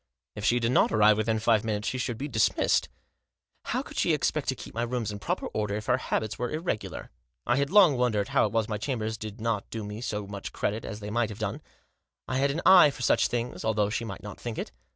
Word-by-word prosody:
If 105 Hz, -, -6 dB
she 120 Hz, -, +3 dB
did 115 Hz, 0 st, 0 dB
not -, -, +4 dB
arrive 105 Hz, -1 st, +5 dB
within 110 Hz, +1 st, +1 dB
five 110 Hz, -1 st, +2 dB
minutes 105 Hz, -1 st, -2 dB
she 130 Hz, -, -2 dB
should 120 Hz, -2 st, -2 dB
be 140 Hz, -, -4 dB
dismissed. 110 Hz, -6 st, +2 dB, 0.8 s
How -, -, -1 dB
could -, -, -11 dB
she -, -, +2 dB
expect -, -, 0 dB
to -, -, +1 dB
keep -, -, -10 dB
my 115 Hz, -, -2 dB
rooms 120 Hz, -3 st, -2 dB
in 105 Hz, -, -6 dB
proper -, -, -2 dB
order 105 Hz, -1 st, -2 dB
if 105 Hz, 0 st, -4 dB
her 125 Hz, -, +2 dB
habits 110 Hz, -3 st, -2 dB
were 120 Hz, 0 st, -1 dB
irregular? 155 Hz, -, -4 dB, 0.3 s
I 120 Hz, -, +2 dB
had 140 Hz, 0 st, +1 dB
long 185 Hz, -8 st, +6 dB
wondered 110 Hz, -5 st, +1 dB
how -, -, +3 dB
it -, -, -8 dB
was 115 Hz, -1 st, +1 dB
my 105 Hz, -1 st, -3 dB
chambers 110 Hz, -3 st, -2 dB
did 110 Hz, 0 st, -8 dB
not 110 Hz, -2 st, -2 dB
do 110 Hz, -1 st, -5 dB
me 105 Hz, +2 st, -6 dB
so 105 Hz, -4 st, -3 dB
much 100 Hz, 0 st, -7 dB
credit 110 Hz, +2 st, -2 dB
as 105 Hz, 0 st, -6 dB
they 105 Hz, 0 st, -5 dB
might 120 Hz, -1 st, +1 dB
have 105 Hz, -, -8 dB
done; 110 Hz, -3 st, -3 dB, 0.7 s
I 130 Hz, -, -1 dB
had 140 Hz, +1 st, +2 dB
an 150 Hz, +5 st, -2 dB
eye 185 Hz, -5 st, +8 dB
for 135 Hz, -3 st, -7 dB
such -, -, +3 dB
things 120 Hz, 0 st, -3 dB
although 105 Hz, -2 st, +1 dB
she 115 Hz, +2 st, -2 dB
might 115 Hz, -, -7 dB
not 105 Hz, -1 st, -8 dB
think 120 Hz, -2 st, -5 dB
it. -, -, -4 dB
110 Hz, 250 wpm, -28 LUFS, 105-125 Hz, 0.8 s, eye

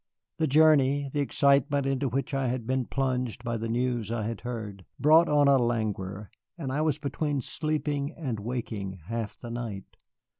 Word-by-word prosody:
The 160 Hz, -, +2 dB
journey, 145 Hz, -2 st, +4 dB
the 145 Hz, -, 0 dB
excitement 140 Hz, 0 st, +3 dB
into 135 Hz, 0 st, 0 dB
which 135 Hz, +5 st, -2 dB
I 135 Hz, -1 st, +1 dB
had 120 Hz, -1 st, -2 dB
been 130 Hz, +1 st, 0 dB
plunged 125 Hz, -4 st, -1 dB
by 115 Hz, -1 st, -2 dB
the 115 Hz, +1 st, -3 dB
news 120 Hz, -2 st, -1 dB
I 115 Hz, -2 st, -1 dB
had 115 Hz, 0 st, -4 dB
heard, 110 Hz, -6 st, -6 dB, 0.2 s
brought 160 Hz, +3 st, +6 dB
on 145 Hz, -1 st, +4 dB
a 140 Hz, -1 st, +6 dB
languor, 105 Hz, -4 st, -2 dB, 0.3 s
and 140 Hz, -6 st, -4 dB
I 145 Hz, +3 st, 0 dB
was 155 Hz, -3 st, +1 dB
between 145 Hz, 0 st, -2 dB
sleeping 150 Hz, +1 st, -2 dB
and 130 Hz, -9 st, -3 dB
waking 105 Hz, -4 st, -4 dB
half 115 Hz, -2 st, -3 dB
the 120 Hz, -, -8 dB
night. 115 Hz, -5 st, -6 dB
130 Hz, 175 wpm, -28 LUFS, 115-145 Hz, 0.3 s, brought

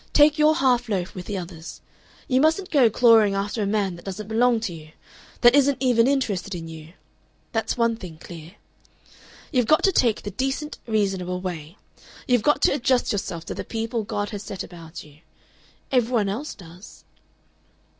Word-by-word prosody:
Take 300 Hz, +1 st, +5 dB
your 305 Hz, +1 st, +5 dB
half 245 Hz, -4 st, +2 dB
loaf 185 Hz, -4 st, -2 dB
with 180 Hz, -1 st, -8 dB
the 205 Hz, -, -3 dB
others. 170 Hz, -2 st, -8 dB, 0.5 s
You 260 Hz, 0 st, +2 dB
mustn't 330 Hz, +5 st, +1 dB
go 270 Hz, -7 st, +5 dB
clawing 225 Hz, -3 st, +5 dB
after 205 Hz, +3 st, -2 dB
a 200 Hz, -, 0 dB
man 200 Hz, -3 st, 0 dB
that 170 Hz, -, -14 dB
doesn't 195 Hz, +2 st, -6 dB
belong 235 Hz, +1 st, +3 dB
to 200 Hz, -6 st, -3 dB
you 155 Hz, -1 st, -12 dB, 0.5 s
that 240 Hz, 0 st, +7 dB
isn't 280 Hz, -1 st, +4 dB
even 245 Hz, -3 st, +3 dB
interested 205 Hz, -9 st, -1 dB
in 165 Hz, -1 st, -7 dB
you. 160 Hz, 0 st, -11 dB, 0.6 s
That's 225 Hz, +1 st, -2 dB
one 230 Hz, -1 st, +1 dB
thing 180 Hz, -7 st, -10 dB
clear. 165 Hz, 0 st, -11 dB, 1.0 s
"You've 250 Hz, -6 st, +1 dB
got 310 Hz, -, +4 dB
to 390 Hz, -, +4 dB
take 235 Hz, -, +1 dB
the 205 Hz, -, -5 dB
decent 270 Hz, -, -3 dB
reasonable 195 Hz, -4 st, -1 dB
way. 175 Hz, -1 st, -6 dB, 0.5 s
You've 245 Hz, -3 st, +3 dB
got 295 Hz, +6 st, +2 dB
to -, -, +5 dB
adjust 255 Hz, -2 st, +1 dB
yourself 175 Hz, -5 st, -4 dB
to -, -, -5 dB
the -, -, -5 dB
people 225 Hz, +1 st, -3 dB
God 205 Hz, -1 st, -3 dB
has 205 Hz, -2 st, -5 dB
set 195 Hz, -2 st, -6 dB
about 165 Hz, -2 st, -10 dB
you. 150 Hz, 0 st, -18 dB, 0.7 s
Every 250 Hz, -2 st, +2 dB
one 215 Hz, -5 st, +1 dB
else 260 Hz, +10 st, -4 dB
does." 180 Hz, +1 st, -14 dB
215 Hz, 180 wpm, -24 LUFS, 180-250 Hz, 1.0 s, that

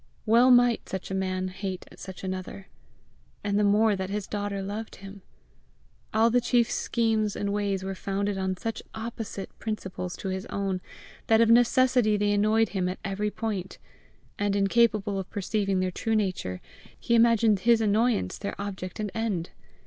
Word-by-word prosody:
Well 235 Hz, +3 st, +5 dB
might 245 Hz, -2 st, +4 dB
such 190 Hz, 0 st, -5 dB
a -, -, -2 dB
man 185 Hz, -1 st, -1 dB
hate 190 Hz, 0 st, -5 dB
such 190 Hz, -1 st, -9 dB
another 185 Hz, +1 st, -5 dB, 0.8 s
and 205 Hz, 0 st, +1 dB
the -, -, +3 dB
more 210 Hz, +1 st, +4 dB
that 190 Hz, -1 st, -4 dB
his 205 Hz, 0 st, -3 dB
daughter 205 Hz, -1 st, -3 dB
loved 210 Hz, +3 st, -5 dB
him! 195 Hz, 0 st, -11 dB, 0.9 s
All 225 Hz, +2 st, +3 dB
the 245 Hz, +1 st, +3 dB
chief's 240 Hz, -1 st, +2 dB
schemes 220 Hz, -3 st, 0 dB
and 200 Hz, 0 st, -2 dB
ways 200 Hz, -2 st, -1 dB
were 195 Hz, 0 st, -3 dB
founded 200 Hz, +1 st, -2 dB
on 190 Hz, -1 st, -2 dB
such 225 Hz, +3 st, -4 dB
opposite 220 Hz, -3 st, -6 dB
principles 190 Hz, -4 st, -4 dB
to 195 Hz, -, -4 dB
his 190 Hz, 0 st, -4 dB
own 195 Hz, -2 st, -2 dB, 0.5 s
that 225 Hz, 0 st, +5 dB
of 230 Hz, 0 st, +5 dB
necessity 245 Hz, -2 st, +4 dB
they 205 Hz, 0 st, +1 dB
annoyed 215 Hz, +1 st, +3 dB
him 185 Hz, -2 st, -1 dB
at 185 Hz, -, -4 dB
every 200 Hz, +2 st, -1 dB
point, 205 Hz, -4 st, -4 dB, 0.6 s
and, 205 Hz, -1 st, +1 dB
incapable 205 Hz, 0 st, +2 dB
of 190 Hz, -, -6 dB
perceiving 195 Hz, -1 st, -1 dB
their 185 Hz, 0 st, 0 dB
true 225 Hz, +5 st, -1 dB
nature, 185 Hz, -, -1 dB, 0.4 s
he 235 Hz, -, -1 dB
imagined 230 Hz, -3 st, +4 dB
his 230 Hz, +2 st, +4 dB
annoyance 220 Hz, -, +1 dB
their 200 Hz, -, -5 dB
object 195 Hz, -2 st, -5 dB
and 210 Hz, -2 st, -2 dB
end. 210 Hz, -7 st, -2 dB
205 Hz, 165 wpm, -27 LUFS, 190-225 Hz, 0.9 s, Well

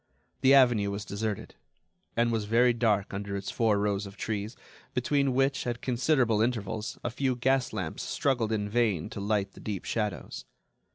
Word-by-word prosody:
The 135 Hz, +1 st, +6 dB
avenue 120 Hz, -7 st, +5 dB
was 100 Hz, +1 st, -4 dB
deserted, 105 Hz, 0 st, -4 dB, 0.6 s
and 120 Hz, 0 st, +3 dB
was 110 Hz, -2 st, -1 dB
very 120 Hz, +3 st, +4 dB
dark 110 Hz, -4 st, +1 dB
under 100 Hz, 0 st, -4 dB
its 100 Hz, -, -4 dB
four 110 Hz, -3 st, +2 dB
rows 100 Hz, 0 st, 0 dB
of 100 Hz, +1 st, -12 dB
trees, 105 Hz, +2 st, -3 dB, 0.4 s
between 135 Hz, +1 st, +1 dB
which, 135 Hz, -1 st, +1 dB
at 120 Hz, -1 st, -2 dB
considerable 125 Hz, -3 st, +2 dB
intervals, 110 Hz, -2 st, -2 dB
a 120 Hz, -, -2 dB
few 130 Hz, +1 st, 0 dB
gas 130 Hz, +1 st, +1 dB
lamps -, -, -4 dB
struggled 120 Hz, -5 st, 0 dB
in 105 Hz, -2 st, 0 dB
vain 105 Hz, -6 st, 0 dB
to -, -, -6 dB
light 100 Hz, -1 st, 0 dB
the -, -, -15 dB
deep 100 Hz, -4 st, -5 dB
shadows. 105 Hz, -5 st, -3 dB
110 Hz, 170 wpm, -29 LUFS, 105-125 Hz, 0.6 s, The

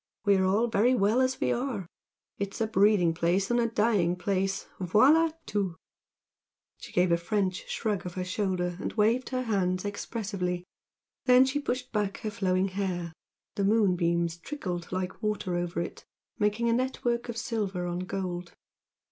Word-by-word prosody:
We 200 Hz, -1 st, +5 dB
are 190 Hz, -, +2 dB
all 200 Hz, +5 st, +3 dB
very 240 Hz, +2 st, +3 dB
well 220 Hz, +3 st, +3 dB
as 260 Hz, 0 st, +1 dB
we -, -, +1 dB
are 240 Hz, -6 st, -2 dB, 0.5 s
it's 200 Hz, 0 st, -3 dB
a 225 Hz, -, +2 dB
breeding 200 Hz, -5 st, +4 dB
place 175 Hz, +5 st, +1 dB
and 240 Hz, -, +3 dB
a 235 Hz, -, +2 dB
dying 210 Hz, -6 st, +2 dB
place 195 Hz, +1 st, -1 dB
voila 265 Hz, -, +5 dB, 0.2 s
tout!" 195 Hz, -5 st, -1 dB, 1.0 s
She -, -, -10 dB
gave 180 Hz, 0 st, +2 dB
a 170 Hz, -, +4 dB
French 185 Hz, +1 st, -1 dB
shrug 210 Hz, -4 st, -1 dB
of 175 Hz, -, -8 dB
her 185 Hz, -1 st, -2 dB
shoulder 180 Hz, -2 st, -1 dB
and -, -, -3 dB
waved 230 Hz, +4 st, +2 dB
her 255 Hz, -1 st, -1 dB
hands 185 Hz, -4 st, 0 dB
expressively. 195 Hz, -4 st, -3 dB, 0.6 s
Then 255 Hz, 0 st, +7 dB
she 265 Hz, +2 st, 0 dB
pushed 255 Hz, -2 st, -3 dB
back 210 Hz, -3 st, -1 dB
her 215 Hz, -2 st, -3 dB
flowing 190 Hz, -2 st, +1 dB
hair, 180 Hz, -3 st, -3 dB, 0.4 s
the 200 Hz, -, -1 dB
moonbeams 175 Hz, -5 st, +2 dB
trickled 175 Hz, -, -5 dB
like 185 Hz, +2 st, -3 dB
water 210 Hz, -4 st, -1 dB
over 175 Hz, -1 st, -2 dB
it, 170 Hz, -, -5 dB, 0.4 s
making 210 Hz, +3 st, +1 dB
a 230 Hz, -, +3 dB
network 240 Hz, -1 st, -1 dB
of 235 Hz, -, -4 dB
silver 205 Hz, -7 st, -2 dB
on 175 Hz, 0 st, -2 dB
gold. 180 Hz, -1 st, -4 dB
200 Hz, 165 wpm, -28 LUFS, 180-230 Hz, 1.0 s, Then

